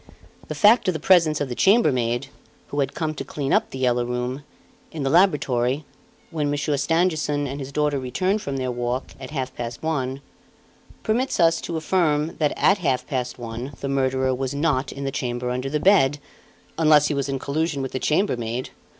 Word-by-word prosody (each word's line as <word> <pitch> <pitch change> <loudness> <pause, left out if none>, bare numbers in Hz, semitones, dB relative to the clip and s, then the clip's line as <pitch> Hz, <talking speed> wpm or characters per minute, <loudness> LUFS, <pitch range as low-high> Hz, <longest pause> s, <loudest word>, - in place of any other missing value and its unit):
The - - -5
fact 220 +1 +5
of 185 - +1
the - - -2
presence 160 -2 +4
of 145 - -1
the 125 - -4
chambermaid 130 - +2 0.4
who 145 - -3
had 135 -1 -1
come 155 -2 -2
to 150 - -5
clean 140 -2 -3
up - - +2
"The - - -7
Yellow 125 -2 +1
Room" 125 +2 -3 0.5
in 155 -3 -4
the 135 - 0
laboratory, 145 -6 +2 0.5
when 150 -3 -1
Monsieur 145 +1 0
Stangerson 155 -1 +1
and 140 +1 -5
his 135 0 -6
daughter 150 -1 0
returned 185 - -1
from 140 -6 -4
their 130 -1 -2
walk, 120 +1 -3
at 130 - -8
half 130 -3 -4
past 120 +2 -6
one, 135 -4 -2 0.8
permits 245 +3 0
us 165 -1 +4
to 165 - -4
affirm 160 -2 0
that 150 -2 +1
at 195 +1 +3
half 135 -7 0
past 125 -4 -3
one 120 +3 -6
the 140 - -4
murderer 130 -1 +1
was 130 +1 -3
not 145 -3 0
in 140 - -7
the 135 - -2
chamber 125 -2 -3
under 130 +2 -2
the 150 +2 -1
bed, 145 -7 +4 0.6
unless 150 -2 +5
he - - 0
was 140 -1 -2
in 135 - -1
collusion 145 +1 -2
with 130 - -4
the 130 - -3
chambermaid. 125 - -1
140 Hz, 195 wpm, -23 LUFS, 130-155 Hz, 0.8 s, fact